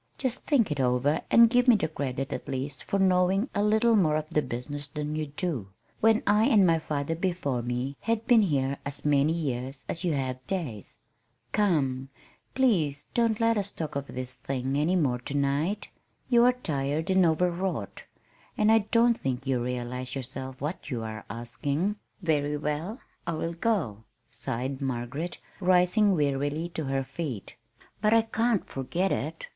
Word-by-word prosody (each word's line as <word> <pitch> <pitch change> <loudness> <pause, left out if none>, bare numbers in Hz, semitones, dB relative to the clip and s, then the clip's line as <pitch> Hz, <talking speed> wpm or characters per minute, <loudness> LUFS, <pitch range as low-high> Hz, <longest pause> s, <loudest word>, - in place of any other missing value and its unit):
Just 255 -3 -1
think 235 - +3
it 145 - -2
over, 130 +3 +2
and 235 0 +8
give 245 +2 +2
me 245 - +8
the 175 -7 0
credit 135 -3 -3
at - - -5
least 135 0 -4
for 200 - -1
knowing 190 +4 +3
a 205 - +1
little 220 +2 +4
more 160 -7 +3
of 155 0 -2
the 150 - +2
business 140 +3 -5
than 150 +1 -4
you 155 -1 -2
do, 145 - -3 0.3
when 225 0 +4
I 210 +2 +4
and 205 -5 +5
my 165 -2 +4
father 150 0 -2
before 170 -8 -1
me, 125 +3 -3
have 230 -1 -1
been 240 -3 +6
here 140 -7 0
as 140 +1 -6
many 145 +1 +3
years 135 -4 -3
as 170 - -4
you 175 -3 +1
have 130 -2 -2
days. 145 - -4 0.5
Come, 135 -10 +1 0.5
please 160 - +1
don't 230 -2 +2
let 230 -1 +3
us 200 0 -2
talk 155 -4 -5
of 140 0 -3
this 130 0 -5
thing 135 0 -3
any 155 +6 +2
more 135 -8 +1
to 140 +4 -6
night. 145 +9 0 0.4
You 240 -1 +6
are 250 - +5
tired 155 - -2
and 190 0 +5
overwrought, 170 - 0 0.5
and 215 +1 +4
I 225 - +6
don't 235 0 +4
think 130 0 -2
you 130 -3 0
realize 125 +1 -4
yourself 130 0 -6
what 150 +3 -4
you 120 -5 -3
are 110 -1 -6
asking." 140 - -2 0.3
"Very 150 -3 +1
well, 150 - -3 0.3
I 170 - 0
will 165 +1 -2
go," 165 - -1 0.2
sighed 130 +4 -4
Margaret, 135 +6 -3 0.2
rising 185 +2 +4
wearily 145 +2 0
to 160 -3 -4
her 135 0 0
feet. 130 - -6 0.5
"But 215 +1 +4
I 225 - +5
can't 225 -1 0
forget 175 +8 -2
it. - - -3
150 Hz, 175 wpm, -28 LUFS, 135-195 Hz, 0.5 s, and